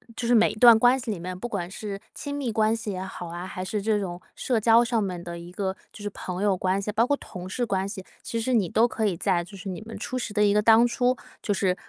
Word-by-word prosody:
就 235 Hz, -, -3 dB
是 245 Hz, -, +5 dB
每 225 Hz, -1 st, +5 dB
一 -, -, -8 dB
段 235 Hz, +1 st, +8 dB
关 245 Hz, +3 st, +5 dB
系 245 Hz, -, -6 dB
里 210 Hz, -, -1 dB
面， 180 Hz, +1 st, -5 dB
不 215 Hz, -, -4 dB
管 180 Hz, -6 st, -3 dB
是 200 Hz, +1 st, -6 dB
亲 285 Hz, -, -6 dB
密 275 Hz, -5 st, -2 dB
关 220 Hz, 0 st, +2 dB
系 220 Hz, -2 st, -4 dB
也 185 Hz, -1 st, -4 dB
好 190 Hz, -2 st, -7 dB
啊， 175 Hz, +1 st, -6 dB
还 185 Hz, 0 st, -5 dB
是 210 Hz, +2 st, -2 dB
这 210 Hz, 0 st, +1 dB
种 180 Hz, -3 st, -5 dB
社 245 Hz, -3 st, 0 dB
交 230 Hz, +2 st, +5 dB
上 230 Hz, -2 st, +1 dB
面 180 Hz, -3 st, -4 dB
的 170 Hz, -1 st, -6 dB
一 170 Hz, +1 st, -10 dB
个 190 Hz, 0 st, -2 dB, 0.2 s
就 210 Hz, -, -11 dB
是 205 Hz, -, -2 dB
朋 185 Hz, 0 st, -5 dB
友 200 Hz, -2 st, +3 dB
关 185 Hz, +1 st, 0 dB
系， 200 Hz, +1 st, -3 dB
包 225 Hz, +3 st, +2 dB
括 285 Hz, -, +2 dB
同 180 Hz, -6 st, -9 dB
事 245 Hz, +5 st, -1 dB
关 195 Hz, -2 st, -1 dB
系， 195 Hz, -3 st, -7 dB, 0.2 s
其 230 Hz, -, -3 dB
实 255 Hz, +3 st, -1 dB
你 205 Hz, -7 st, +2 dB
都 225 Hz, +6 st, +4 dB
可 220 Hz, -2 st, -1 dB
以 185 Hz, -4 st, -1 dB
在 180 Hz, -2 st, +1 dB
就 195 Hz, +3 st, -12 dB
是 190 Hz, -, -9 dB
你 185 Hz, +2 st, -5 dB
们 225 Hz, +1 st, -8 dB
初 240 Hz, +4 st, -5 dB
识 235 Hz, -, -4 dB
的 210 Hz, 0 st, +2 dB
一 200 Hz, -, +4 dB
个 210 Hz, -, +4 dB
当 225 Hz, +2 st, +6 dB
初 245 Hz, +1 st, +1 dB, 0.2 s
就 205 Hz, -, 0 dB
是 185 Hz, -1 st, +1 dB
210 Hz, 315 characters per minute, -26 LUFS, 185-230 Hz, 0.2 s, 段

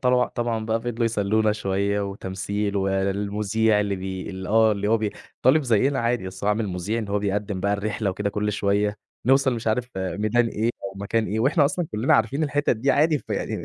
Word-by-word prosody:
طبعًا 125 Hz, -1 st, +3 dB
طبعًا 115 Hz, -2 st, -2 dB
بقى 110 Hz, +1 st, 0 dB
فضلوا 120 Hz, 0 st, -2 dB
يسلّونا 110 Hz, -1 st, +1 dB
شوية 100 Hz, -1 st, -1 dB
وتمثيل، 100 Hz, +1 st, -3 dB
والمذيع 100 Hz, +3 st, +1 dB
اللي 100 Hz, -1 st, -1 dB
بي 95 Hz, 0 st, -5 dB
اللي 95 Hz, -1 st, -6 dB
آه 110 Hz, 0 st, +4 dB
اللي 105 Hz, 0 st, -2 dB
هو 115 Hz, -, +4 dB
بي 105 Hz, -1 st, -1 dB, 0.4 s
-طالِب 150 Hz, +4 st, +6 dB
زينا 130 Hz, +2 st, +2 dB
عادي 115 Hz, -3 st, 0 dB
بس 95 Hz, +1 st, -7 dB
هو -, -, +2 dB
عامِل 105 Hz, 0 st, +1 dB
مذيع 95 Hz, +5 st, -2 dB
إن 110 Hz, -3 st, -4 dB
هو 100 Hz, +1 st, +1 dB
بيقدّم 100 Hz, -1 st, -2 dB
بقى 100 Hz, +1 st, +1 dB
الرحلة 105 Hz, 0 st, -1 dB
وكده 100 Hz, +2 st, -2 dB
كلّ 105 Hz, +1 st, -1 dB
شوية، 105 Hz, 0 st, 0 dB, 0.3 s
نوصل 135 Hz, 0 st, +4 dB
مش 115 Hz, -1 st, -6 dB
عارف 120 Hz, +3 st, 0 dB
ميدان 105 Hz, +5 st, +1 dB
إيه 115 Hz, +1 st, 0 dB
أو 100 Hz, -, -4 dB
مكان 110 Hz, +3 st, -1 dB
إيه، 110 Hz, +4 st, -1 dB
وإحنا 145 Hz, +5 st, +3 dB
أصلًا 165 Hz, +4 st, 0 dB
كُلّنا 110 Hz, +5 st, +2 dB
عارفين 115 Hz, +8 st, +1 dB
الحِتَت 145 Hz, 0 st, +1 dB
دي 130 Hz, +5 st, +1 dB
عادي 155 Hz, +1 st, +3 dB
فيعني، -, -, -3 dB
105 Hz, 200 wpm, -24 LUFS, 100-115 Hz, 0.4 s, طالِب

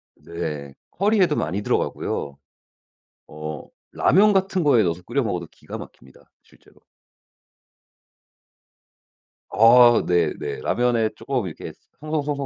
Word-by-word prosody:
네. 75 Hz, -5 st, -6 dB, 0.2 s
커리에도 195 Hz, -5 st, +2 dB
많이 95 Hz, +6 st, -2 dB
들어가고요. 70 Hz, -7 st, -2 dB, 0.9 s
어 75 Hz, 0 st, -7 dB, 0.3 s
라면 205 Hz, +4 st, +4 dB
같은 190 Hz, -2 st, 0 dB
거에 130 Hz, -7 st, +4 dB
넣어서 85 Hz, 0 st, -2 dB
끓여 125 Hz, +7 st, -1 dB
먹어도 90 Hz, -6 st, -3 dB
기가 -, -, -10 dB
막힙니다 65 Hz, +1 st, -15 dB
실제로. -, -, -24 dB, 2.7 s
아 120 Hz, +2 st, +6 dB
네네. 85 Hz, -3 st, -1 dB
라면에 120 Hz, -2 st, +1 dB
쪼금 115 Hz, -3 st, -3 dB
이렇게 80 Hz, -, -8 dB, 0.3 s
송 155 Hz, 0 st, -10 dB
송 155 Hz, -2 st, 0 dB
송 145 Hz, 0 st, -2 dB
115 Hz, 240 characters per minute, -22 LUFS, -, 2.7 s, 아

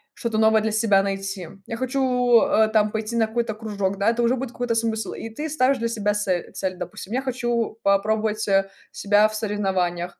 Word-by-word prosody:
что-то 225 Hz, -2 st, -2 dB
новое 220 Hz, 0 st, +4 dB
для 220 Hz, 0 st, -1 dB
себя 210 Hz, -3 st, +3 dB
найти, 195 Hz, -2 st, -4 dB, 0.2 s
я 230 Hz, -, -4 dB
хочу, 250 Hz, -2 st, +2 dB
э, 220 Hz, 0 st, +3 dB
там 215 Hz, -1 st, +3 dB
пойти 220 Hz, +1 st, -3 dB
на 225 Hz, -1 st, +3 dB
какой-то 230 Hz, -1 st, -2 dB
кружок, 200 Hz, -3 st, -3 dB
да, 205 Hz, +3 st, +3 dB
это 240 Hz, 0 st, -1 dB
уже 240 Hz, +2 st, +3 dB
будет 260 Hz, -1 st, -4 dB
какой-то 245 Hz, -2 st, -2 dB
смысл. 225 Hz, -1 st, -1 dB
И 225 Hz, -, -7 dB
ты 300 Hz, +8 st, -5 dB
ставишь 275 Hz, -2 st, +2 dB
для 230 Hz, 0 st, -1 dB
себя 210 Hz, -2 st, 0 dB
сель 185 Hz, -4 st, -2 dB
цель: 185 Hz, -1 st, -3 dB
допустим, 200 Hz, +3 st, -7 dB
я 260 Hz, -, 0 dB
хочу 240 Hz, -4 st, -2 dB
попробовать, 215 Hz, +2 st, +1 dB
э, 195 Hz, 0 st, +2 dB, 0.2 s
себя 205 Hz, +1 st, +3 dB
в 215 Hz, -, -8 dB
соревнованиях, 190 Hz, -5 st, -2 dB
220 Hz, 200 wpm, -23 LUFS, 200-235 Hz, 0.2 s, новое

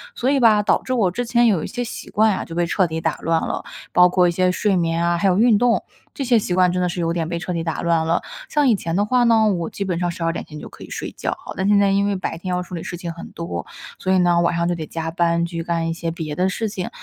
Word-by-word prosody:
所 255 Hz, -, 0 dB
以 280 Hz, 0 st, +3 dB
吧， 220 Hz, -4 st, +5 dB
导 205 Hz, -, +2 dB
致 255 Hz, -, -5 dB
我 220 Hz, -7 st, +2 dB
之 245 Hz, +7 st, -3 dB
前 240 Hz, 0 st, +3 dB
有 190 Hz, -8 st, +2 dB
一 -, -, -4 dB
些 245 Hz, -1 st, -4 dB
习 235 Hz, -, -7 dB
惯 215 Hz, 0 st, +3 dB
啊， -, -, -3 dB
就 165 Hz, -, -9 dB
被 175 Hz, 0 st, +1 dB
彻 185 Hz, +2 st, +1 dB
底 160 Hz, 0 st, -3 dB
打 160 Hz, -, 0 dB
乱 165 Hz, 0 st, +1 dB
了。 -, -, -3 dB, 0.3 s
包 180 Hz, 0 st, +6 dB
括 180 Hz, 0 st, +3 dB
一 -, -, +2 dB
些 185 Hz, +1 st, +2 dB
睡 200 Hz, +2 st, +1 dB
眠 165 Hz, -1 st, 0 dB
啊， 170 Hz, 0 st, +1 dB
还 195 Hz, -, +1 dB
有 185 Hz, -1 st, +3 dB
运 225 Hz, 0 st, +5 dB
动， 240 Hz, +1 st, +2 dB, 0.3 s
这 280 Hz, -, -4 dB
些 240 Hz, -2 st, +4 dB
习 185 Hz, -, -2 dB
惯 180 Hz, -1 st, +4 dB
真 180 Hz, 0 st, -1 dB
的 180 Hz, -, +1 dB
是 175 Hz, -, -4 dB
有 165 Hz, 0 st, 0 dB
点 165 Hz, -2 st, -2 dB
被 170 Hz, -, -2 dB
彻 180 Hz, 0 st, -4 dB
底 165 Hz, -1 st, -2 dB
打 165 Hz, -1 st, -3 dB
乱 165 Hz, -1 st, +1 dB
了， 165 Hz, -, +1 dB, 0.3 s
像 295 Hz, -2 st, +2 dB
以 235 Hz, -, +5 dB
前 165 Hz, -4 st, -3 dB
的 205 Hz, +2 st, +2 dB
话 250 Hz, +3 st, +2 dB
呢， 225 Hz, -2 st, +4 dB
我 170 Hz, -2 st, -3 dB
基 200 Hz, -, -4 dB
本 180 Hz, -3 st, -2 dB
上 175 Hz, -1 st, 0 dB
12 165 Hz, -1 st, -2 dB
点 -, -, -5 dB
前 150 Hz, -1 st, -10 dB
就 -, -, -8 dB
可 -, -, -13 dB
以 -, -, -11 dB
睡 -, -, -5 dB
觉 -, -, -2 dB
哈， -, -, -10 dB
但 190 Hz, -, -1 dB
现 205 Hz, 0 st, +5 dB
在 200 Hz, -1 st, +3 dB
因 200 Hz, +1 st, +2 dB
为 200 Hz, -, 0 dB
白 185 Hz, -3 st, -4 dB
天 185 Hz, +2 st, -6 dB
要 180 Hz, -, 0 dB
处 180 Hz, 0 st, -7 dB
理 165 Hz, -, -5 dB
事 175 Hz, -, -6 dB
情 170 Hz, -1 st, -5 dB
很 170 Hz, -, -10 dB
多， 125 Hz, -, -5 dB, 0.3 s
所 185 Hz, -, -1 dB
以 -, -, +4 dB
呢， 175 Hz, -1 st, +3 dB
晚 170 Hz, 0 st, +1 dB
上 170 Hz, 0 st, 0 dB
就 175 Hz, -, 0 dB
得 160 Hz, -2 st, -5 dB
加 165 Hz, 0 st, -4 dB
班 170 Hz, 0 st, +1 dB
去 170 Hz, -1 st, -4 dB
干 165 Hz, -1 st, -1 dB
一 -, -, -1 dB
些 165 Hz, 0 st, -4 dB
别 160 Hz, -3 st, -5 dB
的 185 Hz, +4 st, +1 dB
事 220 Hz, +4 st, -2 dB
情， 190 Hz, -3 st, -4 dB
180 Hz, 340 characters per minute, -21 LUFS, 170-205 Hz, 0.3 s, 包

